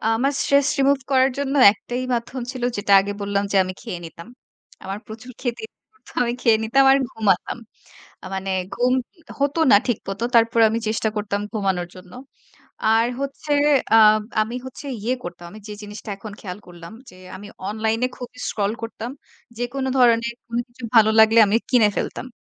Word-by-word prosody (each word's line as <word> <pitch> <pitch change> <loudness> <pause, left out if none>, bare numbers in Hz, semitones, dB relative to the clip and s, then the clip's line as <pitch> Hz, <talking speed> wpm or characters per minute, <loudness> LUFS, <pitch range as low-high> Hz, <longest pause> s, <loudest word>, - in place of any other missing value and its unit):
আমার 270 +5 +1
stress 280 0 +3
remove 275 0 +3
করার 260 0 +4
জন্য 280 0 -2 0.2
একটাই 245 +4 -5
মাধ্যম 240 +2 -3
ছিল, 255 -2 -7
যেটা 205 0 -2
আগে 200 +1 -2
বললাম, 200 0 -1
যে - - -1
আমি 185 0 -5
খেয়ে 175 - -6
নিতাম। 165 +4 -11 0.6
আমার 195 +2 -5
প্রচুর 230 +4 -10
খেতে 240 - -3
ইচ্ছা - - -65
করত, 435 - -30 0.2
আমি 240 0 -1
খেয়ে 225 -2 +4
নিতাম 270 +5 +3
আর 270 - +5
ঘুমাতাম। 205 0 0 0.7
আ - - -9
মানে 190 0 -4 0.2
ঘুম 250 +1 +1 0.5
হত 280 +2 0 0.2
না 205 - +9
ঠিকমত। 200 -3 -3
তারপর 230 0 +4
আমি 230 +1 -1
চেষ্টা 220 0 0
করতাম 205 -1 -2
ঘুমানোর 190 -4 -1
জন্য। 180 0 -14 0.8
আর 225 +1 +3
হচ্ছে 275 +2 -4 0.4
আ - - +8 0.5
আমি 230 +3 -5
হচ্ছে 260 +2 -9 0.2
ইয়ে 250 +3 0
করতাম। 175 0 -8
আমি 215 - -11
যে - - -6
জিনিসটা 210 +1 -9
এখন 210 +1 -9
খেয়াল 185 0 -7
করলাম, 175 +1 -12 0.2
যে 185 - -17 0.2
আমি 205 +2 -11 0.2
অনলাইনে 220 +3 0
খুবই 250 0 -10
scroll 205 0 -1
করতাম। 230 +1 -6 0.5
যেকোন 255 +2 -3
ধরনের 235 -1 +3
কোন 235 0 -5
কিছু 240 +1 -18
ভালো 220 -1 +6
লাগলে 220 +1 +6
আমি 210 +3 +2
কিনে 235 -5 +5
ফেলতাম। - - -3
225 Hz, 175 wpm, -22 LUFS, 205-250 Hz, 0.8 s, না